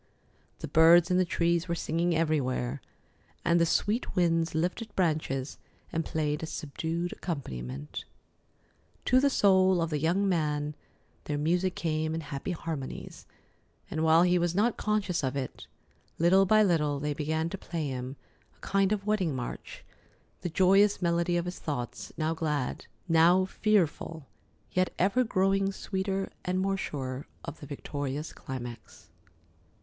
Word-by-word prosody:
The - - -4
birds 165 +4 +6
in 180 - +4
the 185 - +3
trees 170 +1 +1
were 170 - -1
singing 170 +1 0
everywhere, 140 -5 0 0.6
and 170 0 +4
the 170 - +4
sweet 215 +8 0
winds 165 -3 +2
lifted 180 +7 -2
branches 150 -6 -1 0.3
and 165 - 0
played 150 -2 -1
a 160 - -4
subdued 165 +4 -3
accompaniment. 70 - -5 1.0
To 255 - +5
the 280 +1 +4
soul 190 -6 +4
of 165 -1 -1
the 150 - 0
young 175 +6 +2
man, 150 -4 0 0.5
their 145 - -2
music 175 +5 +1
came 155 -1 -1
in 165 - -3
happy 140 +2 -5
harmonies, 160 -6 -5 0.6
and, 160 - -1
while 160 +1 +6
he 180 0 +3
was 175 0 0
not 220 +4 +2
conscious 205 -6 0
of 130 0 -1
it, 135 -2 -5 0.5
little 190 +4 +5
by 215 +2 +6
little 150 -7 +1
they 150 +1 -1
began 160 +2 -1
to 195 - -5
play 165 -4 -3
him 130 +1 -5 0.4
a - - -32
kind 195 0 +1
of 205 -2 -1
wedding 195 -9 +1
march, 125 -2 -6 0.6
the 175 - -2
joyous 195 +4 +4
melody 170 0 +1
of 170 - -1
his 180 0 -5
thoughts, 130 -6 -4
now 160 0 0
glad, 150 -5 -2 0.2
now 170 +3 +5
fearful, 175 -6 0 0.5
yet 185 0 +1
ever 200 +8 +3
growing 195 -2 +1
sweeter 195 0 -3
and 185 +1 -1
more 195 +1 +1
sure 135 -7 -4 0.2
of - - -7
the 145 - -9
victorious 145 +1 -4
climax. 120 -4 -8
165 Hz, 150 wpm, -29 LUFS, 150-185 Hz, 1.0 s, birds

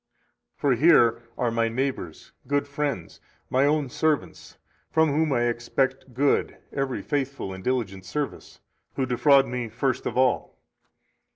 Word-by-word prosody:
For 140 -2 +2
here 120 -4 +5 0.2
are 120 -2 0
my 115 0 +1
neighbors, 125 - -4 0.2
good 145 0 0
friends, 140 - -3 0.3
my 135 +2 +3
own 150 -1 +1
servants, 155 +3 -2 0.3
from 160 -2 +3
whom 155 +1 +1
I 120 -3 +2
expect 125 +2 -1
good 140 +2 +1 0.2
[every 135 -2 -2
faithful 140 -8 -2
and 95 0 -9
diligent 105 -7 -2
service], 145 +9 -5 0.3
who 135 - 0
defraud 135 +2 +4
me 125 -2 -4
first 130 +3 -1
of - - -4
all. 130 -1 +1
130 Hz, 135 wpm, -25 LUFS, 120-145 Hz, 0.3 s, here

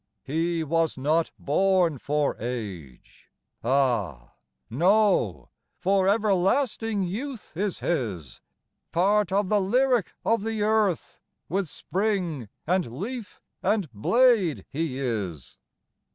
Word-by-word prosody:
He 165 +3 -1
"was 165 0 0
not 155 +5 +1
born 175 -1 +2
for 150 +2 0
age." 100 - -7 0.3
Ah 115 - 0 0.3
no, 170 - +2 0.3
For 190 +1 +2
everlasting 210 +2 +1
youth 225 - -5
is 200 +2 -2
his! 105 - -3 0.5
Part 200 +3 +2
of 200 0 +1
the 210 -1 +3
lyric 245 +2 +2
of 225 -3 +2
the 220 -1 -1
earth 210 -5 0 0.3
With 190 -1 -1
spring 180 - -2 0.2
and 180 -6 0
leaf 230 +2 -6 0.2
and 205 - 0
blade 215 - +3
he 150 -3 -2
is. 100 - -4
175 Hz, 105 wpm, -26 LUFS, 135-205 Hz, 0.5 s, the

